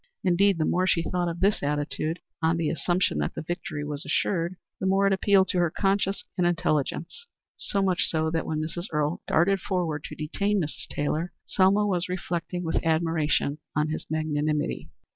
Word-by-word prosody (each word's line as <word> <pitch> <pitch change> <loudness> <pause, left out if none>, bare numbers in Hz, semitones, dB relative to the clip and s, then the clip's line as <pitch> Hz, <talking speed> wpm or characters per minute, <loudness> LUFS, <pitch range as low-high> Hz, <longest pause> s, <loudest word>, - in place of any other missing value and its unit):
Indeed, 190 +1 +4
the 155 - +1
more 185 +1 +2
she 170 -3 +2
thought 175 0 -1
of 170 0 -4
this 200 +2 +3
attitude, 150 +3 -1 0.2
on 165 +1 +2
the 165 -2 0
assumption 175 +2 +1
that - - -2
the - - -4
victory 160 -3 -4
was 150 0 -4
assured, 175 -1 0 0.2
the 190 - -1
more 195 +1 +3
it 195 - +4
appealed 195 0 +4
to 180 - +1
her 175 -1 +3
conscience 195 +2 0 0.2
and 175 - +4
intelligence; 170 - -1 0.3
so 200 -1 0
much 185 -2 +2
so 160 -1 0
that 165 0 -1
when 155 -1 -1
Mrs. 170 +4 -4
Earle 150 +1 0
darted 195 +4 +3
forward 170 -6 -1
to - - -7
detain 200 +7 0
Mrs. 155 -4 -4
Taylor, 155 +4 -2
Selma 200 +2 +3
was 185 -3 +1
reflecting 175 -1 -3
with 165 - -1
admiration 160 -2 +1 0.2
on 150 +1 +1
his 155 - -4
magnanimity. 155 -1 -1
170 Hz, 180 wpm, -27 LUFS, 155-190 Hz, 0.3 s, Indeed